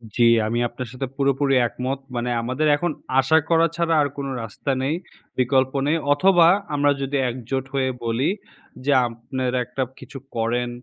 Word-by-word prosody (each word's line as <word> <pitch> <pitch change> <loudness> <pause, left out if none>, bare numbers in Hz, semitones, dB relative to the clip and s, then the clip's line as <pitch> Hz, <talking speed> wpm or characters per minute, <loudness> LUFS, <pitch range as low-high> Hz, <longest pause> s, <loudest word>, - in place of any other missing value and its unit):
জি, 120 - +3 0.2
আমি 120 +2 -1
আপনার 120 +1 -7
সাথে 130 +1 -4
পুরোপুরি 140 0 +1
একমত। 130 +3 -4 0.2
মানে 120 +1 -1
আমাদের 130 +6 -1
এখন 175 +1 -1 0.3
আশা 135 +5 +4
করা 165 0 +4
ছাড়া 170 -1 +1
আর 145 - +2
কোনো 140 -1 -3
রাস্তা 115 +5 -4
নেই, 145 +4 0 0.4
বিকল্প 130 +1 +2
নেই। 160 +2 +2 0.2
অথবা, 175 +1 +5 0.3
আমরা 145 0 +3
যদি 140 +1 -1
একজোট 130 +2 -4
হয়ে 130 -1 +1 0.2
বলি 115 +7 +1 0.6
যে, 145 - +2 0.2
"আপনেরা 125 +2 -3
একটা 130 +2 -3 0.2
কিছু 135 - -10 0.2
করেন।" 120 +2 0
135 Hz, 160 wpm, -22 LUFS, 125-145 Hz, 0.6 s, অথবা